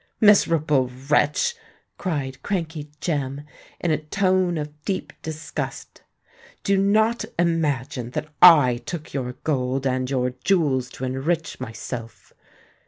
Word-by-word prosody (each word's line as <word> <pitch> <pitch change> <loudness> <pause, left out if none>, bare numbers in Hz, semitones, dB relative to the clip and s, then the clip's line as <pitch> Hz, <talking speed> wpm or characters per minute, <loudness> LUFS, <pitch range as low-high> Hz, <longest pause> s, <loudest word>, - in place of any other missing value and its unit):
"Miserable 155 - +4 0.2
wretch!" 150 - +3 0.5
cried 140 -7 -3
Crankey 165 -6 -3
Jem, 145 -4 -2 0.4
in 170 - 0
a 155 - +1
tone 185 +2 +1
of 150 0 -6
deep 190 - -3
disgust: 155 -1 -6 0.6
"do 200 - +2
not 215 +4 +3
imagine 145 -7 0
that 150 +4 -4
I 145 -9 +8
took 160 +5 -7
your 125 -3 -3
gold 135 -2 0
and 130 -1 0
your 125 -2 0
jewels 140 -10 +2
to 130 - -5
enrich 155 +6 -2
myself. 115 +1 -7
150 Hz, 115 wpm, -23 LUFS, 130-175 Hz, 0.6 s, I